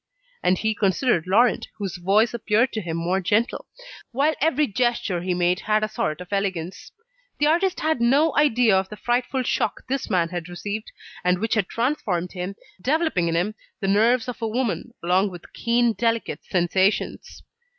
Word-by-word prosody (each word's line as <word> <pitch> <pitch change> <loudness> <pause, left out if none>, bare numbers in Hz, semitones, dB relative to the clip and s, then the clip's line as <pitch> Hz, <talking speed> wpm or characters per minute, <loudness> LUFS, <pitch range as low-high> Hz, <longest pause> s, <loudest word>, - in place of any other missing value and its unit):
And 180 +1 +2
he 220 +2 0
considered 195 -2 +1
Laurent, 230 +6 +3
whose 195 -4 -4
voice 205 +6 +2
appeared 235 +1 +1
to 220 - -2
him 165 -3 -4
more 180 +3 0
gentle, 215 +6 0 0.4
while 280 +6 +2
every 305 -1 +3
gesture 230 -6 0
he 180 0 -1
made 180 +1 +1
had 215 0 +1
a - - +1
sort 215 -8 -3
of 180 +2 -8
elegance. 190 -3 -3 0.5
The 295 - +2
artist 350 +4 +2
had 315 -6 0
no 280 +6 +3
idea 245 -8 +4
of 190 0 0
the 210 - -8
frightful 250 +3 0
shock 220 - -1
this 270 +1 -2
man 175 -5 +1
had 175 -1 -5
received, 205 +5 -5 0.3
and 180 0 +2
which 225 +4 -1
had 215 -4 +1
transformed 215 - -1
him, 185 +1 -5 0.3
developing 295 - +1
in 165 - 0
him 180 +6 0 0.3
the 195 - -2
nerves 225 +5 +3
of 245 -1 -6
a 225 - 0
woman, 235 0 -2
along 185 +4 +2
with 175 -2 -12
keen, 235 0 +2
delicate 230 +2 -1
sensations. 185 +2 0
215 Hz, 175 wpm, -23 LUFS, 180-240 Hz, 0.5 s, idea